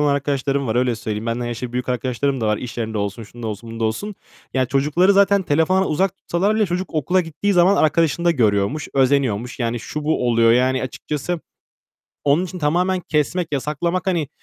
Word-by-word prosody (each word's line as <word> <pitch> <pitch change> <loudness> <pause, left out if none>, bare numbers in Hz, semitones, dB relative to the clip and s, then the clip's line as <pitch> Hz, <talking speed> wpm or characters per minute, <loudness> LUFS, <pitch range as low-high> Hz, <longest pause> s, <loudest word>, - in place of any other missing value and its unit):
olan 145 -1 +3
arkadaşlarım 140 -1 -1
var. 110 +1 -1
Öyle 125 -1 +2
söyleyeyim. 110 0 -4
Benden 120 +1 -2
yaşı 120 +1 -5
büyük 125 +1 -3
arkadaşlarım 130 +2 -1
da 110 - 0
var. 105 0 +2
İş 120 -1 -7
yerinde 110 -2 -2
olsun, 100 +3 -3
şunda 115 +2 -9
olsun, 110 +2 -6
bunda 115 0 -3
olsun. 200 - -2 0.4
Yani, 130 -1 +1
çocukları 150 +8 +3
zaten 200 0 +4
telefondan 180 +5 +2
uzak 185 +4 0
tutsalar 195 +5 0
bile 215 -2 +2
çocuk 180 +1 -3
okula 175 +5 +2
gittiği 165 +5 -2
zaman 180 +2 +4
arkadaşında 165 +2 +2
görüyormuş, 115 +1 +1
özeniyormuş. 130 -4 +1
Yani, 120 -1 -1
şu, 150 +4 -5
bu 150 -5 +1
oluyor, 115 -1 +4
yani, 130 +2 +2
açıkçası 150 +5 -4 0.8
onun 145 +5 +3
için 180 0 -7
tamamen 180 +4 +1
kesmek, 160 +2 -1
yasaklamak, 170 +7 -1
hani, 170 -6 0
140 Hz, 185 wpm, -21 LUFS, 120-175 Hz, 0.8 s, zaten